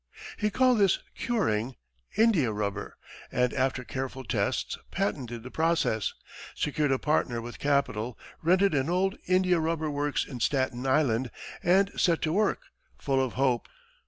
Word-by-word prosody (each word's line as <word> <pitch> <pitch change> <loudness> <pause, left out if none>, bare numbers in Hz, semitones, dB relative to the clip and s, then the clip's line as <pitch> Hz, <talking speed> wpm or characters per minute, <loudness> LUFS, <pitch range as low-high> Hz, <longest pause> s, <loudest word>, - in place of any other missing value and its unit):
He 210 -1 0
called 250 +2 +3
this 195 -3 +4 0.2
"curing" 130 - 0 0.4
India 200 - +4
rubber, 105 -1 -3 0.3
and 125 0 +1
after 130 -1 0
careful 130 +1 -5
tests, 115 - -1
patented 125 - -2
the 125 - -9
process, 160 -9 +1 0.4
secured 150 -1 0
a 135 - +3
partner 135 -5 0
with 120 +1 -8
capital, 135 -5 0 0.2
rented 185 +3 +3
an 140 +1 +1
old 190 +2 +1
India 185 -1 +3
rubber 160 -1 -1
works 145 0 0
on 125 - -7
Staten 130 0 0
Island, 130 -3 +2 0.3
and 190 +3 +3
set 170 -2 +2
to 155 - +1
work, 210 +2 +1 0.4
full 135 -1 +1
of 130 - -3
hope. 130 -3 +1
140 Hz, 145 wpm, -28 LUFS, 125-180 Hz, 0.4 s, this